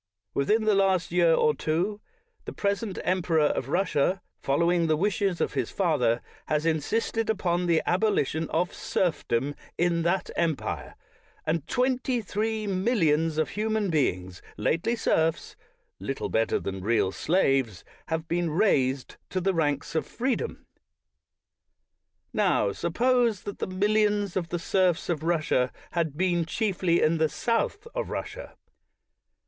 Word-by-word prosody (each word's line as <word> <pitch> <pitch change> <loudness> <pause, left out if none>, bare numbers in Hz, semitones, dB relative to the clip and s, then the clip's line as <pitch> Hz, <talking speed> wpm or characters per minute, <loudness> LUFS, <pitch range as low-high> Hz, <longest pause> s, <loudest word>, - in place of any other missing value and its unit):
Within 210 +11 +2
the 215 -1 +3
last 190 -3 +2
year 170 -2 +4
or 150 - +3
two, 175 +9 -1 0.4
the - - -6
present 200 0 -2
emperor 175 -4 +2
of 135 -3 -1
Russia, 180 +1 +1 0.2
following 170 +4 +2
the 155 -1 +2
wishes 195 0 0
of - - -1
his - - -1
father, 125 -11 +1 0.2
has 150 0 0
insisted 220 +8 0
upon 180 -4 0
the 165 -2 +3
abolition 175 -5 +1
of 175 +2 0
serfdom 145 -6 -1 0.2
in 170 -1 +2
that 175 +3 0
empire; 155 -10 -2 0.5
and 155 -1 -1
twenty 255 0 +1
three 215 +1 -2
millions 175 -6 +1
of 155 - +1
human 215 -2 -1
beings, 95 - -1 0.2
lately 175 +9 0
serfs, 160 -7 0 0.4
little 135 0 -3
better 115 0 +1
than 95 -1 -5
real 105 -1 +1
slaves, 135 - +1 0.2
have 160 0 -2
been 170 0 0
raised 140 - +1
to 185 - -1
the 190 +1 +1
ranks 145 -3 -1
of 160 - -1
freedom. 250 -1 -2 1.7
Now, 100 - +2
suppose 230 - +1
that 205 - -6
the - - -2
mil 190 +3 0
lions 205 -3 +2
of 170 -3 -2
the 175 - -1
serfs 180 0 +1
of 165 -4 0
Russia 155 -6 +1 0.2
had 160 -4 -1
been 175 -1 +2
chiefly 185 -4 +1
in 160 +1 +2
the 160 -1 +3
south 235 - -1
of - - -3
Russia. - - -6
170 Hz, 140 wpm, -27 LUFS, 155-200 Hz, 1.7 s, year